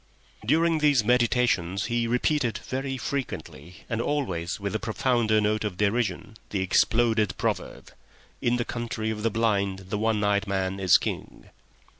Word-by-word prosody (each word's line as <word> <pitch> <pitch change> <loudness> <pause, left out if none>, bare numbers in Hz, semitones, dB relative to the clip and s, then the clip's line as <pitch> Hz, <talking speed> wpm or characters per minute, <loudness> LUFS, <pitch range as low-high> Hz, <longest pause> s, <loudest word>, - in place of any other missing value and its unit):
During 160 +7 +2
these 145 -6 +4
meditations 120 -6 +2
he 120 0 0
repeated 125 -1 +1
very 135 0 -4
frequently 90 - -5
and 115 -1 -2
always 95 - -2
with 100 -1 -3
a 110 - -1
profounder 115 -1 +1
note 105 +1 +1
of 105 -4 -3
derision 105 0 -1
the 100 - -1
exploded 110 +3 +2
proverb: - - -3 0.5
"In 120 0 +2
the 120 -1 -1
Country 115 -2 -3
of 105 -1 -5
the 115 - +1
Blind 100 -4 0
the 105 - -1
One 110 -1 +1
Eyed 100 0 +1
Man 95 0 -1
is 95 -2 +6
King." - - -6
110 Hz, 150 wpm, -26 LUFS, 100-120 Hz, 0.5 s, is